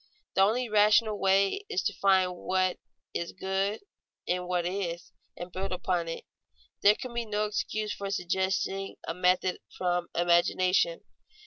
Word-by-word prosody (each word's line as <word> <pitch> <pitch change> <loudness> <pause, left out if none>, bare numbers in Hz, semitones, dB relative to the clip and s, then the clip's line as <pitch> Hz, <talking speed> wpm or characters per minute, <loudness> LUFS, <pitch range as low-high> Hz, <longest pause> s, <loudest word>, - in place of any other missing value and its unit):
The 190 - +3
only 230 +6 +3
rational 215 0 +4
way 195 - +3
is 185 - -1
to - - 0
find 190 -2 +3
what 185 0 0 0.3
is 170 - -3
good 190 +2 -1 0.4
in 180 0 -1
what 180 -1 0
is, 175 -2 -3 0.3
and 175 +1 -7
build 190 +2 -4
upon 180 -2 -1
it. 165 - -5 0.6
There 205 +1 +6
can 250 +1 -7
be 235 0 -1
no 210 -1 -1
excuse 215 0 -2
for 200 0 -5
suggesting 190 +1 -1
a 165 - -1
method 180 +1 +1 0.2
from 175 -1 0
imagination. 180 - +2
190 Hz, 145 wpm, -29 LUFS, 180-205 Hz, 0.6 s, There